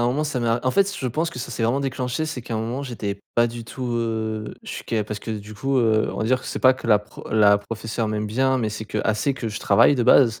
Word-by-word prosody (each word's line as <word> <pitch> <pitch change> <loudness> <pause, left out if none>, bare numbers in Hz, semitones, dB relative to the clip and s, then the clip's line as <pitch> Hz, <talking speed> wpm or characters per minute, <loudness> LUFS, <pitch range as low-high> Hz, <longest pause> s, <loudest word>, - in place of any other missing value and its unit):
un 120 - +2
moment, 145 +5 0
ça 145 -4 -2
m'a, 115 0 +1
en 130 - +2
fait, 200 +6 +3
je 130 - -2
pense, 155 +8 -1
que 145 - -8
ça 120 - -5
s'est 115 - -3
vraiment 125 +5 +2
déclenché 130 +2 -2
c'est 155 -5 -4
qu'à 115 -1 -6
un - - 0
moment, 120 +5 -3
j'étais 105 -6 -4
pas 120 0 +4
du 120 0 -6
tout, 120 +2 -5
heu, 110 -2 -2
je - - -8
suis - - -6
qu'a 110 -3 -1
parce 105 0 -5
que, 115 - -6
du 105 0 -6
coup, 135 +5 -1
heu, 110 -3 +2
on - - -6
va - - 0
dire 125 +2 +2
que - - -10
c'est - - -3
pas 130 - +6
que 130 -2 -8
la, 110 - +6
heu, - - -1
pro - - -12
la 105 -2 +5
professeur 110 +2 -4
m'aime 105 0 -2
bien, 130 +5 +1
mais 110 -4 -1
c'est 105 0 -6
qu'elle 110 0 0
sait 135 +6 0
que 115 -3 -4
je 105 +3 -5
travaille - - +5
de 125 - +1
base. 120 -2 +5
115 Hz, 305 wpm, -23 LUFS, 110-130 Hz, -, pas